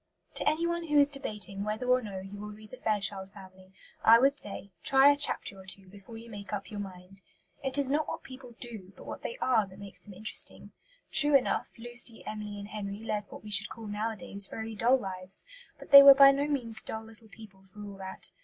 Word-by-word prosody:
To - - +2
anyone 340 +2 -1
who 300 -1 +2
is 285 0 +5
debating 205 -7 -3
whether 215 +4 -3
or 250 0 +3
no 195 -4 -7
he 195 +1 -9
will 210 +1 -7
read 215 0 -13
the 255 - -9
Fairchild 200 -3 -2
Family, 190 -1 -15 0.3
I 225 +1 +8
would 270 +4 +4
say, 200 -6 -9
Try 275 +1 +6
a - - +2
chapter 280 -8 +1
or 190 - -14
two 190 +1 -5
before 200 +3 -12
you 230 +1 -11
make 205 -2 -9
up 205 0 -5
your 210 - -6
mind. 190 0 -10 0.4
It 270 0 0
is 275 -2 +2
not 300 +1 +1
what - - -5
people 255 -2 -12
do, 215 -6 -8
but - - -12
what - - -7
they 485 - -5
are 235 - +2
that 190 0 -15
makes 200 -1 -9
them 205 -3 -12
interesting. 215 +3 -1 0.4
True 295 -1 +4
enough, 270 - +2
Lucy, 240 0 -3
Emily 210 -1 -6
and 200 0 -8
Henry 205 0 -6
led 210 -2 -2
what - - -11
we 210 - -9
should 205 0 +3
call 225 - -9
nowadays 205 -1 +1
very 220 0 -6
dull 235 +5 +3
lives; 190 -3 -6 0.3
but - - -14
they 280 0 +13
were 280 0 +10
by 275 0 +9
no 280 +1 -1
means 245 -7 -1
dull 220 0 -5
little 225 0 -16
people 200 -3 -15
for 195 +2 -13
all 200 -1 -9
that. 190 -1 -8
215 Hz, 225 wpm, -29 LUFS, 200-255 Hz, 0.4 s, they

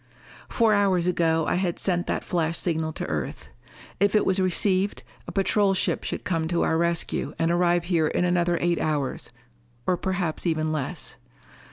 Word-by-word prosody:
Four 225 -2 +3
hours 195 -4 +2
ago 165 -3 +1
I - - +1
had 175 -3 -1
sent 175 -2 0
that - - -1
flash 170 -1 -1
signal 160 -2 -1
to - - -4
Earth. 75 -3 -4 0.5
If 200 +2 +2
it 210 - +3
was 190 0 +2
received, 190 +1 +1 0.2
a - - -5
patrol 195 0 +2
ship - - 0
could - - -4
come 165 -3 -1
to 170 0 +1
our - - +1
rescue 170 0 -1
and 165 +1 +1
arrive 175 0 +2
here 170 -3 +1
in 180 - 0
another 175 -1 +1
eight 175 -1 +1
hours 145 -4 -2 0.5
or 180 - +1
perhaps 180 -3 -2
even 155 -1 0
less. 150 -4 -4
175 Hz, 175 wpm, -25 LUFS, 160-185 Hz, 0.5 s, Four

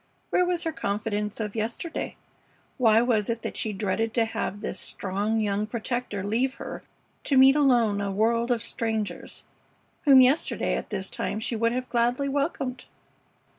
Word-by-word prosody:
Where 360 - +3
was 355 -1 0
her 325 - -1
confidence 210 -5 -2
of 210 -1 -4
yesterday? 230 +9 -3 0.6
Why 225 -2 +5
was 225 -4 +1
it 230 -1 -2
that - - -4
she 220 - -2
dreaded 210 +3 -1
to 230 -2 +3
have 205 -2 -4
this - - -2
strong 205 +3 -1
young 210 0 0
protector 235 -3 -3
leave 245 +6 0
her - - -7 0.4
to 275 - +2
meet 265 +1 +8
alone 240 -8 +3
a 200 - -1
world 230 +4 +1
of 235 -3 +1
strangers, 220 -3 -3 0.6
whom 275 -3 +8
yesterday 260 +5 +2
at - - -5
this 195 -3 -4
time 215 - -2
she 230 +1 -3
would 230 +1 +1
have 255 +1 -3
gladly 245 +3 +1
welcomed? 275 -2 -2
230 Hz, 165 wpm, -26 LUFS, 210-255 Hz, 0.6 s, meet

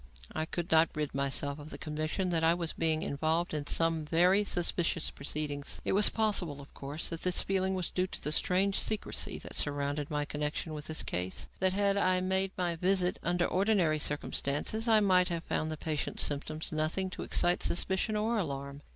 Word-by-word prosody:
I 155 - -1
could 170 +1 -5
not 160 0 +5
rid 150 -1 -2
myself 140 +1 0
of 150 +1 -10
the - - -7
conviction 155 +5 -2
that 165 -1 +1
I 165 +1 +5
was 170 -2 -3
being 160 -1 +1
involved 160 +4 0
in 145 -1 -3
some 165 -1 +1
very 180 +6 +4
suspicious 175 -3 0
proceedings. 145 0 -4
It - - 0
was 205 +2 +6
possible, 200 -10 0
of 140 - -13
course, 145 +3 -4
that 165 -1 -5
this 180 -1 +1
feeling 190 0 0
was 185 -2 -3
due 185 0 0
to - - -7
the 150 - -1
strange 190 +5 +2
secrecy 215 -1 -1
that - - -8
surrounded 145 0 -1
my 150 -1 -1
connection 150 +2 -3
with 150 -1 -5
this 160 - -1
case; 90 +1 -3
that, 185 -1 +3
had 200 0 +2
I 185 -2 +3
made 190 +1 +1
my 175 -2 0
visit 180 +1 +1
under 175 0 +1
ordinary 185 -6 +2
conditions, 150 - -1
I 220 -2 +5
might 185 -2 +4
have 170 -1 -3
found 155 - -1
in - - -4
the 155 - -4
patient's 150 -1 -1
symptoms 155 +2 -2
nothing 160 +5 -1
to - - -7
excite 175 0 +2
suspicion 190 +4 +1
or 220 +2 0
alarm. 140 -4 -4
165 Hz, 195 wpm, -31 LUFS, 150-185 Hz, -, was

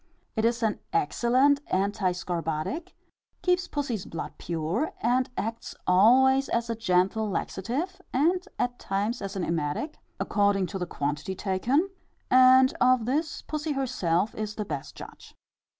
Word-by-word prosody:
It 220 -1 +1
is 235 0 +1
an 220 -2 0
excellent 285 -7 +3
anti 195 0 +1
scorbutic, 175 - -3 0.5
keeps 360 0 +2
pussy's 255 -9 -3
blood 165 - -6
pure, 170 - -2
and 250 +2 +1
acts 225 +2 -4
always 260 +8 +5
as 235 0 0
a - - -1
gentle 210 +1 +1
laxative, 255 - -3
and 340 +8 +2
at 245 0 -1
times 205 +5 -2
as 195 0 -5
an 190 - -2
emetic, 165 - -2 0.2
according 200 -2 +2
to 195 - -3
the 180 - -3
quantity 150 +5 -3
taken, 245 - 0 0.4
and 255 +1 +7
of 250 -2 +4
this 300 +5 -1
pussy 305 0 -3
herself 215 -8 0
is 210 -1 -4
the 210 - -3
best 145 -7 -6
judge. - - -12
230 Hz, 140 wpm, -27 LUFS, 185-265 Hz, 0.5 s, and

